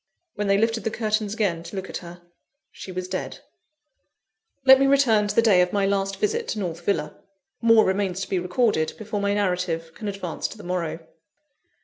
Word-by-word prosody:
When 210 -1 -3
they 200 0 +4
lifted 225 +1 0
the - - 0
curtains 215 -1 -1
again 195 -7 0
to 170 +3 -9
look 190 -1 -4
at - - -5
her, 175 0 -11 0.5
she 190 - -9
was 185 0 -4
dead. 185 0 -5 1.2
Let 265 0 +9
me 275 - +4
return 240 -7 +4
to - - -3
the 230 - +4
day 200 -6 +5
of 180 0 +1
my 200 -1 +1
last 195 0 0
visit 450 +2 0
to 215 - -3
North 170 -3 -4
Villa. 200 - -1 0.5
More 230 -1 +6
remains 190 -1 -1
to - - -5
be 190 - 0
recorded, 180 -2 +1
before 215 -1 -4
my 200 0 +1
narrative 180 -4 -1
can 210 +6 -7
advance 195 -4 -3
to - - -11
the 210 - -11
morrow. 170 -2 -3
200 Hz, 200 wpm, -24 LUFS, 180-220 Hz, 1.2 s, Let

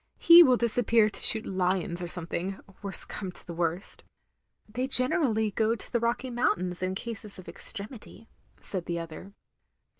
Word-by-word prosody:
"He 340 +1 +9
will 255 -7 +5
disappear 230 -2 +2
to - - -1
shoot 220 -1 +4
lions 180 -2 -1
or 175 - -4
something 175 +2 -4
— 195 - -19
^worst 200 -1 -4
come 190 -3 -5
to - - -12
the 170 - -7
worst. 170 +2 -3 0.3
" - - -48
"They 250 +2 -2
generally 250 - +2
go 220 +2 +1
to - - -5
the 235 - +2
Rocky 235 +2 -2
Mountains 185 -7 -1
in 185 0 -2
cases 215 -1 -6
of 185 - -12
extremity, 215 +5 -5 0.2
" - - -39
said 185 -4 -6
the 170 - -2
other. 165 +4 -8
205 Hz, 180 wpm, -28 LUFS, 180-235 Hz, 0.3 s, He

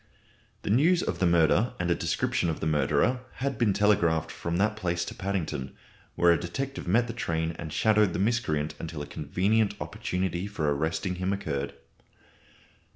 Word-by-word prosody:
The - - -1
news 165 - +4
of - - -3
the 90 - +3
murder 85 +8 +3
and 90 0 0
a - - +6
description 85 0 0
of 80 - -3
the - - -3
murderer 80 - +2
had 135 -3 -3
been 115 -4 +3
telegraphed 85 -6 +2
from 85 0 -3
that 105 +2 +2
place 85 -5 -1
to - - -6
Paddington, 90 -9 -3 0.4
where 85 0 +5
a 85 - +3
detective 135 - -4
met 115 +7 +3
the 115 - -5
train 80 -7 -1
and 80 -2 -5
shadowed 105 -2 +3
the - - -1
miscreant 90 -8 0
until 80 -3 -5
a - - -6
convenient 95 +10 0
opportunity 90 0 -2
for 80 -8 0
arresting 80 +5 -2
him 95 +1 -1
occurred. 70 -8 -3
90 Hz, 170 wpm, -28 LUFS, 80-105 Hz, 0.4 s, a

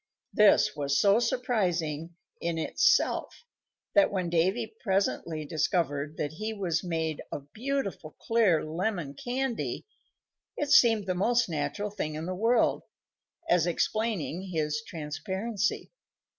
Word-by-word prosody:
This 210 -6 +5
was 140 -1 0
so 200 +7 +5
surprising 175 -10 -1 0.2
in 170 -1 -2
itself 160 - +1 0.5
that 300 -1 +5
when 185 -4 -2
Davy 195 +7 +1
presently 190 -6 0
discovered 155 -2 -1
that 145 - -2
he 215 +7 -4
was 180 -5 -1
made 160 -3 -2
of 145 0 -7
beautiful, 230 - -3
clear 220 -9 +2
lemon 170 -2 -2
candy, 245 - -3 0.7
it 290 -1 -2
seemed 225 -7 +6
the 185 - 0
most 235 +6 +2
natural 200 +7 -2
thing 155 -7 -4
in 155 +1 -4
the 185 - -3
world, 225 +5 +2 0.7
as 175 - +3
explaining 195 -1 -1
his 150 -2 -1
transparency. 190 +8 -3
185 Hz, 120 wpm, -28 LUFS, 160-220 Hz, 0.7 s, seemed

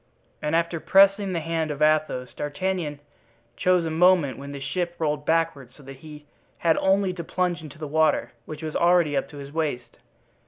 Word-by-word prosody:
And 150 +2 -1
after 170 0 0
pressing 195 +2 +4
the 170 - -1
hand 165 0 -2
of 145 -1 -4
Athos, 155 -5 +1
D'Artagnan 150 0 -3 0.6
chose 180 -2 +2
a 160 - -2
moment 165 -5 +3
when 140 +1 -8
the 140 - -7
ship 170 +6 -3
rolled 150 -2 -2
backward, 145 -6 0
so 145 - -16
that 135 0 -11
he 150 +1 -12 0.3
had 165 -2 +2
only 190 -1 +2
to 175 -2 -6
plunge 175 0 -1
into 155 -2 -11
the 155 - -6
water, 155 +2 +1 0.2
which 155 0 -8
was 155 -1 -5
already 170 -4 +3
up 135 - -1
to 145 - -11
his 140 0 -9
waist. 145 -7 -3
160 Hz, 190 wpm, -24 LUFS, 145-175 Hz, 0.6 s, pressing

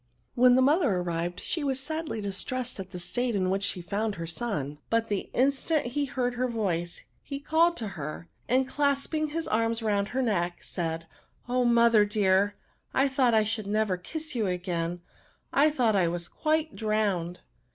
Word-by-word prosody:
When 250 0 +6
the 260 - +5
mother 290 - +3
arrived 175 0 -2
she 325 - -2
was 270 -2 0
sadlj 310 -5 -3
distressed 245 +5 -3
at 190 -1 -6
the 180 - -7
state 230 +7 -1
in 185 -2 +1
which 195 +1 0
she 195 -3 -2
found 205 +4 -1
her 170 -2 -5
son. 160 - -3
But 230 0 +1
the 205 -2 -2
instant 280 +4 +1
he 285 +4 -1
heard 245 -1 -1
her 250 +1 0
voice, 180 -8 -2 0.2
he 280 -1 -6
called 325 +4 +3
to 220 -3 -3
her; 155 -2 -6 0.2
and, 260 +1 +3
clasping 285 +2 0
his 325 +2 -3
arms 225 +1 0
round 200 -2 +1
her 260 +3 -1
neck, 175 -6 -1
said, 165 -2 -3
^^ - - -19 0.4
Oh, 250 +1 +1
dear - - +1
mother! 205 -4 +4 0.4
I 270 +1 +4
thought 260 -3 +3
I 220 - +5
should 215 -1 -2
never 210 -2 +1
kiss 310 - -6
you 225 -5 0
again; 175 -1 -2 0.5
I 295 +2 +5
thought 245 -8 +2
I 185 -3 +3
was 170 0 -2
quite 315 -1 -1
drowned." 205 -6 -1
220 Hz, 185 wpm, -28 LUFS, 185-265 Hz, 0.5 s, When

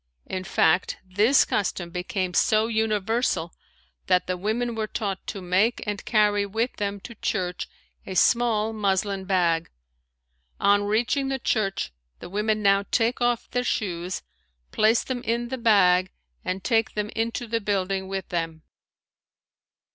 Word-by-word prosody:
In 185 0 -4
fact 180 0 +2
this 210 +9 +4
custom 180 -4 -2
became 180 +1 -2
so 215 +4 +3
universal 220 -4 0 0.5
that 180 -1 +3
the 185 - -1
women 220 +6 -1
were 220 -1 -2
taught 200 -4 -4
to 195 - -5
make 190 +6 +2
and 205 -1 -3
carry 210 -2 +3
with 225 +5 -2
them 200 -1 -2
to 235 - -9
church 185 -4 -2 0.4
a 190 - -5
small 225 0 +3
muslin 200 -2 0
bag. 175 -4 +1 0.9
On 205 0 +3
reaching 240 +6 +1
the 270 - -1
church 195 - -1 0.2
the - - -10
women 215 +1 0
now 195 0 +4
take 235 +1 +1
off 240 -1 +1
their 245 - 0
shoes, 180 -6 -2 0.5
place 220 +2 +3
them 255 -2 -4
in 235 0 -1
the 260 0 -4
bag, 185 -5 +4 0.3
and 185 +1 -3
take 225 -2 +1
them 210 0 -2
into 230 +2 -2
the 230 0 -1
building 195 -1 -1
with 195 -1 -4
them. 165 -2 -3
205 Hz, 145 wpm, -25 LUFS, 185-225 Hz, 0.9 s, this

